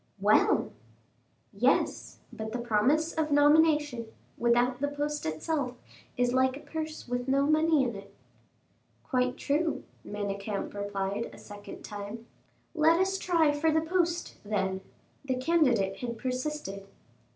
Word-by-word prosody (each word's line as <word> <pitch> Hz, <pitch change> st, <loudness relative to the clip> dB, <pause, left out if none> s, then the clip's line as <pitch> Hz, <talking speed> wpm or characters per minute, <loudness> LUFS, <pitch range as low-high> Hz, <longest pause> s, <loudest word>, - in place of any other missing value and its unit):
"Well!" -, -, +3 dB, 0.8 s
"Yes; -, -, +1 dB, 0.2 s
but 220 Hz, 0 st, -5 dB
the -, -, -1 dB
promise 245 Hz, +8 st, +2 dB
of 315 Hz, -1 st, 0 dB
nomination, 295 Hz, -4 st, +4 dB, 0.3 s
without 240 Hz, +1 st, +2 dB
the 285 Hz, -, 0 dB
post 290 Hz, -, -3 dB
itself, 250 Hz, -, -2 dB, 0.4 s
is 245 Hz, 0 st, +2 dB
like 260 Hz, +1 st, +2 dB
a -, -, -11 dB
purse 315 Hz, -2 st, -6 dB
with 245 Hz, +1 st, -2 dB
no 275 Hz, +1 st, +3 dB
money 310 Hz, -1 st, +4 dB
in 240 Hz, -4 st, -2 dB
it." 195 Hz, 0 st, -10 dB, 0.9 s
"Quite 255 Hz, -3 st, 0 dB
true," 310 Hz, +3 st, 0 dB, 0.2 s
Manicamp 200 Hz, 0 st, -4 dB
replied 200 Hz, +1 st, -3 dB
a -, -, -13 dB
second 205 Hz, 0 st, -10 dB
time. 205 Hz, +2 st, -7 dB, 0.5 s
"Let 325 Hz, +1 st, +4 dB
us 385 Hz, +1 st, +1 dB
try 330 Hz, -4 st, +3 dB
for 295 Hz, +2 st, +1 dB
the 315 Hz, -, +3 dB
post, 345 Hz, +1 st, -1 dB
then," 190 Hz, -2 st, -1 dB, 0.4 s
the 265 Hz, -2 st, -1 dB
candidate 255 Hz, -, +2 dB
had 235 Hz, -2 st, -4 dB
persisted. 255 Hz, -6 st, -4 dB
255 Hz, 130 wpm, -29 LUFS, 215-310 Hz, 0.9 s, nomination